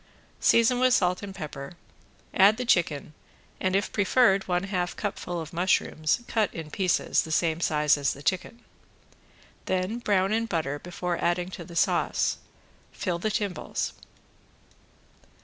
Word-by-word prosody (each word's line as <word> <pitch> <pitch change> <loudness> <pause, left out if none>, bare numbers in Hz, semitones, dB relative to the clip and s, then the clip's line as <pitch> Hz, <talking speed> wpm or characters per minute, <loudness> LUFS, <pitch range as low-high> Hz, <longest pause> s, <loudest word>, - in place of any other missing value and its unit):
Season 230 +2 +4
with 255 0 +4
salt 180 -1 +1
and 195 -2 -7
pepper, 150 -5 -7 0.6
add 205 +3 +6
the 250 - -3
chicken 155 -8 +1 0.5
and, 185 0 0
if 195 0 0
preferred, 200 -1 +3
one 180 0 0
half 180 -3 -2
cupful 180 -4 -4
of 160 0 -7
mushrooms 170 0 +1
cut 220 -3 +1
in 160 -2 -7
pieces 185 0 +1
the 160 - -7
same 160 0 +1
size 150 -2 +2
as 140 - +1
the 140 - -12
chicken. 210 +8 -2 1.0
Then 185 +5 -1
brown 200 -3 +1
in 230 +1 0
butter 155 -7 -2
before 175 +1 -4
adding 175 +1 0
to 175 - -7
the 170 +1 -12
sauce. - - +1 0.5
Fill 175 -3 -3
the 215 - -1
timbales. 200 -4 -2
180 Hz, 145 wpm, -27 LUFS, 165-205 Hz, 1.0 s, add